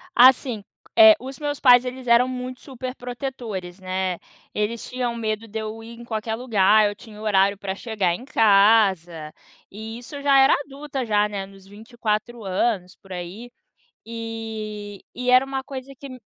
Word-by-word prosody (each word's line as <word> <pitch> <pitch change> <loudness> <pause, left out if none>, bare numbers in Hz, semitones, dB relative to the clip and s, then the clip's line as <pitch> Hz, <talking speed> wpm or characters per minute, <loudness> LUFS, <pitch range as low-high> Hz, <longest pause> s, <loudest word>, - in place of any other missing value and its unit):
Assim, 245 -3 +5 0.3
eh, 330 -1 +9
os 265 +1 -9
meus 290 -1 -3
pais, 250 -2 +6
eles 255 0 -6
eram 235 +1 +5
muito 255 0 -6
superprotetores, 245 -7 -6
né. 185 -1 -2 0.4
Eles 210 +2 -2
tinham 250 -2 -2
medo 220 0 -3
de 220 +1 -5
eu 220 +1 -6
ir 230 +1 -11
em 235 - -10
qualquer 220 -1 -3
lugar, 215 -3 +3
eu 205 - -2
tinha 210 0 -14
horário 200 -2 +2
pra 195 -1 -4
chegar 200 -5 -1
em 240 - -8
casa, 195 - +3 0.4
e 220 +3 -8
isso 245 +4 -11
eu 280 - -7
já 280 -1 +5
era 270 0 +6
adulta 280 -1 -5
já, 210 -1 +2
né, 200 -2 -5
nos 195 -1 -17
24 220 +1 -4
anos, 190 -1 -1
por 195 - -14
aí. 185 +7 -7 0.6
E 220 -3 -6
e 250 0 -1
era 255 +1 +6
uma 270 0 -4
coisa 270 0 -8
que 280 - -9
me 255 -1 -10
225 Hz, 170 wpm, -23 LUFS, 205-250 Hz, 0.6 s, eh